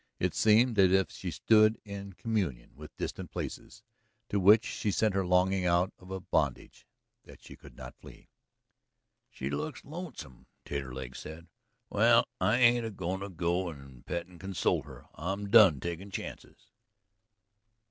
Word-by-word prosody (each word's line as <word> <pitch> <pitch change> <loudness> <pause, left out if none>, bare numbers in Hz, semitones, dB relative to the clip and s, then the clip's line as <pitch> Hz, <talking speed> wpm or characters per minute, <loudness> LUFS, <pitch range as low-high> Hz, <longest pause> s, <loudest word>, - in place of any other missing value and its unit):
It - - -1
seemed 110 +1 +4
as 95 -2 +6
if 95 0 +2
she 95 - -6
stood 110 +5 +4
in 100 -1 -8
communion 90 - -3
with 75 +2 -13
distant - - -5
places, - - -7 0.5
to 100 - 0
which 105 +4 +6
she 105 - -3
sent 105 +1 +1
her 95 0 +1
longing 90 +1 +2
out 90 +1 +2
of 90 - -15
a 95 0 -4
bondage 90 - -2 0.4
that - - -14
she - - -12
could - - -16
not - - -9
flee. - - -15 1.0
"She 65 +2 -5
looks 75 +2 -4
lonesome," 140 - -9 0.2
Taterleg 65 -2 -5
said. 80 +2 -9 0.5
"Well, - - +4
I 105 +5 +2
ain't 120 -1 +4
a 115 - -3
goin' 95 -2 -4
to 100 +1 -6
go 90 0 -1
and 70 -5 -12
pet 85 0 -4
and 90 -1 -17
console 95 0 0
her. - - -13
I'm 100 +4 -4
done 100 - +7
takin' 85 +5 -5
chances." - - -9
95 Hz, 160 wpm, -30 LUFS, 85-105 Hz, 1.0 s, done